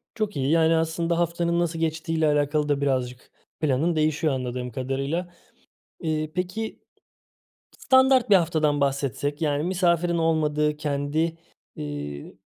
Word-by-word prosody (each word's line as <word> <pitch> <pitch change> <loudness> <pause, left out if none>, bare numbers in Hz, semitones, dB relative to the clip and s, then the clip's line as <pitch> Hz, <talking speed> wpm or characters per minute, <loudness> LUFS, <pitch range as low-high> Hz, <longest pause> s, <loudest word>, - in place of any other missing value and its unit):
Çok 215 -2 -2
iyi, 135 0 0
yani, 165 0 +4
aslında 165 +1 0
haftanın 170 0 0
nasıl 170 -1 -1
geçtiğiyle 160 0 0
alakalı 150 0 +1
da 145 -1 +1
birazcık 130 -3 -2 0.3
planın 155 +3 +1
değişiyor 155 -1 +1
anladığım 125 -1 -4
kadarıyla. 135 +8 -3 0.7
İii, 155 -1 -2
peki. 185 +5 -4 1.0
Standart 260 -2 +4
1 205 - +7
haftadan 155 -5 +2
bahsetsek, 140 +1 -1
yani, 145 -2 0
misafirin 175 -1 +1
olmadığı, 150 -2 +1
kendi, 150 +2 -1 0.4
iii, 75 -1 -6
155 Hz, 120 wpm, -25 LUFS, 140-170 Hz, 1.0 s, 1